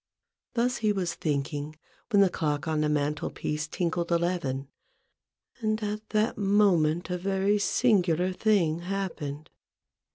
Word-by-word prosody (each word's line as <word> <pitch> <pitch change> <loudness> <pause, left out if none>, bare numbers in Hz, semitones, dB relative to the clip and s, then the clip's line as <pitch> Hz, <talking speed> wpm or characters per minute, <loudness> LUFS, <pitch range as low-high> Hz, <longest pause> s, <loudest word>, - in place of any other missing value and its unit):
Thus 250 +2 +1
he 215 -1 +1
was 185 -4 -1
thinking 145 0 -2 0.3
when 200 -3 +5
the 190 - +3
clock 150 -4 -1
on 155 -1 0
the 150 - +1
mantel 150 0 0
piece 150 +1 -3
tinkled 170 +1 -2
92 170 - +3
A - - +5
BOOK 175 +2 +1
OF 175 - -5
BARGAINS, 135 -1 -3
eleven; - - -40 0.9
and 215 -1 -1
at 210 +1 -4
that 215 +1 +1
moment 185 -5 +3
a 180 - -1
very 195 +2 +1
singular 185 -6 +2
thing 180 -6 +2
happened. 170 -6 -4
175 Hz, 160 wpm, -28 LUFS, 155-205 Hz, 0.9 s, when